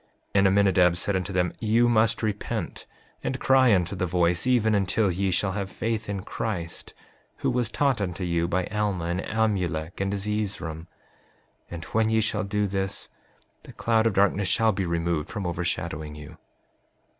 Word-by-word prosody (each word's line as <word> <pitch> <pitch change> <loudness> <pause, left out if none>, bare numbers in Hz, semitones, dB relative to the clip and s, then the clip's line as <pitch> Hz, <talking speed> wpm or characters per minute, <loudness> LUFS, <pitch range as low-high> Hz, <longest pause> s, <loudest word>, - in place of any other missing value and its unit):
5:41 - - -38 0.3
And 100 -1 +5
Aminadab 95 -3 +4
said 100 +3 0
unto 95 +1 -2
them: 90 -1 0
You 115 +2 +3
must 115 -1 +3
repent, 105 -2 -3 0.4
and 130 - -2
cry 130 -2 +5
unto 90 -1 +2
the 90 -1 -1
voice, 85 +2 +1
even 115 -4 +3
until 100 0 +2
ye 95 +2 0
shall 95 +2 +1
have 100 0 -3
faith 110 0 -3
in 100 -2 -3
Christ, 90 -7 -4 0.5
who - - +3
was 120 -2 0
taught 135 -6 +1
unto 90 -1 -3
you 85 -1 0
by 90 +1 0
Alma, 105 -5 -1
and 85 +2 -1
Amulek, 95 -7 -1
and 100 0 0
Zeezrom; 100 -5 -3 0.8
and 85 -1 -6
when 110 0 +1
ye 110 0 +3
shall 110 -1 0
do 105 +1 0
this, 95 0 -3 0.5
the - - -13
cloud 115 -1 +2
of 110 - 0
darkness 100 0 +3
shall 110 +6 +3
be 95 -3 -2
removed 85 -2 -1
from 105 -4 -4
overshadowing 80 -3 -3
you. 75 -1 -11
100 Hz, 170 wpm, -26 LUFS, 90-110 Hz, 0.8 s, And